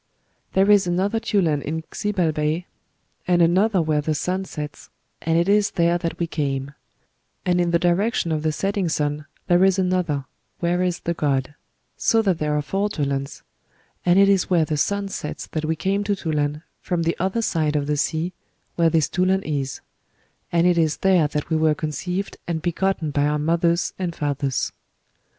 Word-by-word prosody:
There 195 +2 +4
is 200 -3 +5
another 190 +5 +1
Tulan 170 -10 +1
in 160 +2 -4
Xibalbay, 165 -4 -1 0.6
and 175 -1 +3
another 185 +3 +3
where 155 -1 +1
the 155 +1 -1
sun 185 +5 -2
sets, 150 -4 -7 0.3
and 165 0 +1
it 170 +2 +2
is 205 0 +3
there 170 0 +1
that 170 -1 -3
we 170 - 0
came; 140 -3 -3 0.7
and 180 -1 +2
in 175 - +1
the 170 - +3
direction 175 +2 +1
of 155 -1 0
the 155 0 +1
setting 195 +2 -1
sun 150 -1 -1 0.2
there 175 +1 +4
is 190 0 +4
another, 180 -7 0 0.3
where 175 +1 +1
is 180 -1 -1
the 170 - -1
god; 140 -3 -1 0.4
so 225 -1 +3
that 185 -5 +1
there 150 -1 0
are 150 - -1
four 195 +7 -1
Tulans; 140 -6 -3 0.6
and 175 +1 +4
it 200 0 +6
is 195 -2 +2
where 170 -4 +3
the 155 - -2
sun 200 +7 0
sets 150 -6 -5
that 155 -1 -4
we 160 +1 0
came 195 +5 0
to 205 0 +1
Tulan, 150 -4 -2 0.2
from 175 -2 -1
the 165 +1 0
other 190 +6 0
side 155 -6 0
of 145 -1 +1
the 150 +1 0
sea, 160 +4 -1 0.4
where 165 -1 +4
this 160 -2 +2
Tulan 190 +1 +1
is; 140 -3 -3 0.7
and 170 0 +3
it 175 -1 +4
is 160 -2 +1
there 185 -5 +3
that 150 +2 -4
we 160 - +3
were 155 -1 +3
conceived 180 +6 -3
and 165 -2 -2
begotten 175 -2 0
by 145 0 +1
our 150 0 +1
mothers 170 +3 +1
and 175 -3 -2
fathers." 140 -2 -1
170 Hz, 185 wpm, -23 LUFS, 150-185 Hz, 0.7 s, it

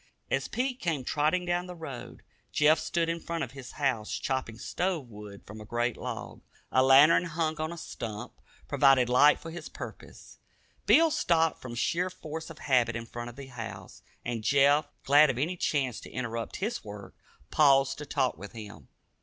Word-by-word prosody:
As 135 0 0
Pete 255 +2 -2
came 160 -6 -1
trotting 155 +7 +1
down 175 +1 -1
the 180 - -8
road, 150 -7 -8 0.3
Jeff 150 +1 +4
stood 165 +1 -1
in 165 0 -1
front 165 -1 -3
of 125 - -6
his 135 -2 -10
house 125 -7 -1
chopping 130 -4 -2
stove 175 +3 -2
wood 105 -1 -11
from 110 +1 -10
a - - -7
great 120 +2 -1
log. - - -6 0.3
A 130 - +4
lantern, 140 +6 +7
hung 160 -1 -2
on 155 +1 -2
a 170 - -7
stump, 110 -8 -6 0.3
provided 135 -3 +4
light 135 +4 +6
for 165 - -8
his 170 - -8
purpose. - - -10 0.5
Pete 325 -1 +6
stopped 165 - +2
from 125 -2 -7
sheer 175 +9 0
force 160 -3 -7
of 165 - -10
habit 125 -6 +2
in 115 0 -4
front 120 +1 -7
of 120 - -12
the 140 +1 -8
house, 110 -8 -8 0.2
and 115 -2 -3
Jeff, 140 +4 +4 0.2
glad 145 +2 +6
of 130 - -1
any 160 +8 -1
chance 140 -8 -1
to - - -11
interrupt 115 -2 -4
his 215 +5 -3
work, 105 -1 -9 0.4
paused 135 -2 +4
to 150 - -6
talk 130 -3 0
with 100 +1 -9
him. 100 - -10
140 Hz, 185 wpm, -29 LUFS, 120-165 Hz, 0.5 s, lantern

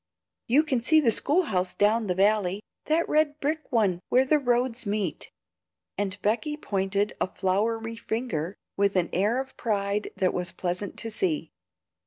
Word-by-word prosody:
You 275 +6 +4
can 265 -6 0
see 315 +6 +5
the 250 -7 +3
school 320 +10 +3
house 185 - -1
down 215 +2 +2
the 180 - 0
valley, 200 0 +2 0.2
that 325 +2 +1
red 305 -1 +1
brick 310 +2 -2
one 205 -8 +2
where 255 +2 +4
the 300 +3 +3
roads 245 -2 0
meet;" 200 -4 -2 0.7
and 200 0 -3
Becky 270 +9 0
pointed 200 -4 -1
a - - +2
floury 225 +4 -1
finger, 215 -7 -3 0.2
with 200 0 +1
an 180 -2 +1
air 210 +7 +2
of 265 0 -6
pride 205 -2 -1
that 190 -2 +1
was 180 -1 -2
pleasant 180 +2 -3
to 225 - -3
see. 315 - -1
215 Hz, 165 wpm, -26 LUFS, 195-260 Hz, 0.7 s, see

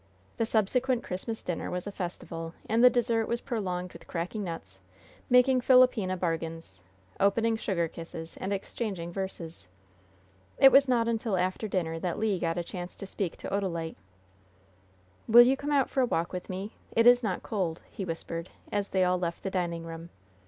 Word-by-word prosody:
The 225 - 0
subsequent 240 +4 +1
Christmas 220 +5 -5
dinner 175 - -3
was 180 0 -3
a 205 - -4
festival, 170 -3 -6
and 230 +2 +3
the 250 - +10
dessert 235 -2 +1
was 235 - 0
prolonged 180 -7 -3
with - - -13
cracking 180 +5 -3
nuts, 95 - -7 0.5
making 250 +1 +5
"philopena" 250 -8 +4
bargains, 165 - -4 0.4
opening 225 +3 +3
sugar 190 -6 -1
kisses 165 0 -8
and 190 - -4
exchanging 195 -3 -4
"verses." 170 - -6 0.9
It 270 0 +8
was 275 0 +6
not 235 -2 +2
until 225 -3 0
after 185 +4 -1
dinner 165 -5 -1
that 175 0 -2
Le 210 -3 0
got 165 0 -1
a 175 - -1
chance 175 +1 -7
to - - -8
speak 190 -2 -4
to - - -6
Odalite. 175 -5 -2 1.3
"Will 240 +2 +9
you 260 +2 +4
come 285 +2 -5
out 275 -3 +3
for 265 - 0
a 250 - +3
walk 170 -4 -1
with 180 - -5
me? 195 +3 -5 0.2
It 230 - +4
is 245 0 +7
not 195 -6 -2
cold," 180 -6 -2
he 195 - -5
whispered, 165 0 -5 0.2
as 205 -1 -1
they 190 -1 +2
all 180 0 +2
left 170 -1 -3
the 195 - -2
dining 170 -3 -2
room. 165 +1 -8
190 Hz, 180 wpm, -29 LUFS, 170-230 Hz, 1.3 s, the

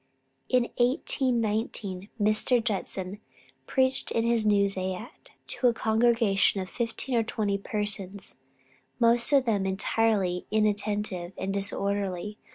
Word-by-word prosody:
In 250 -1 +3 0.2
April, 240 - +6 0.4
1819, 215 -4 -2
Mr. 215 +3 +3
Judson 195 -3 -3 0.5
preached 260 -1 +1
in 230 - 0
his 230 -2 +2
new 200 -1 +4
zayat 190 +3 -5 0.2
to 250 - 0
a 235 - +2
congregation 220 -3 +2
of 185 -1 -5
fifteen 235 +2 -3
or 235 - +3
twenty 210 -3 -1
persons, 200 -3 -1 0.6
most 235 +1 +4
of 275 -2 +4
them 205 -4 +1
entirely 190 -2 0
inattentive 205 -4 -1
and 195 +1 -3
disorderly. 200 0 -2
210 Hz, 120 wpm, -27 LUFS, 195-230 Hz, 0.6 s, April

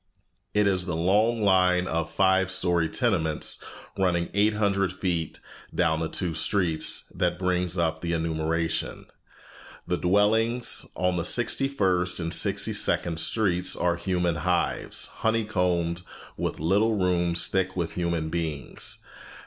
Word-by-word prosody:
It 105 0 +4
is 95 -2 +1
the 85 - -2
long 105 +7 +2
line 90 -2 +3
of 85 -1 -2
five 95 +1 +2
story 90 -3 +1
tenements, 80 - 0 0.4
running 85 -2 +1
eight 105 +2 +2
hundred 100 -3 +1
feet 90 -4 -3 0.4
down 80 -3 +2
the 80 -1 -2
two 90 -3 -2
streets, 80 -2 +1
that 90 -1 0
brings 90 -1 -1
up 80 -1 0
the 85 0 -2
enumeration. 80 0 -2 0.8
The 90 0 -1
dwellings 110 +6 +2
on 90 -1 0
Sixty 120 +7 +2
first 90 -9 0
and 85 -1 -1
Sixty - - +2
second 85 -2 0
Streets 95 -2 0
are 90 -1 0
human 90 -1 -1
hives, 90 +2 -1
honeycombed 90 -6 0 0.3
with - - -3
little 105 +7 +2
rooms 85 -2 +2
thick 95 -1 -1
with 85 -2 -2
human 85 -3 -2
beings. 80 -5 -5
90 Hz, 130 wpm, -26 LUFS, 85-95 Hz, 0.8 s, It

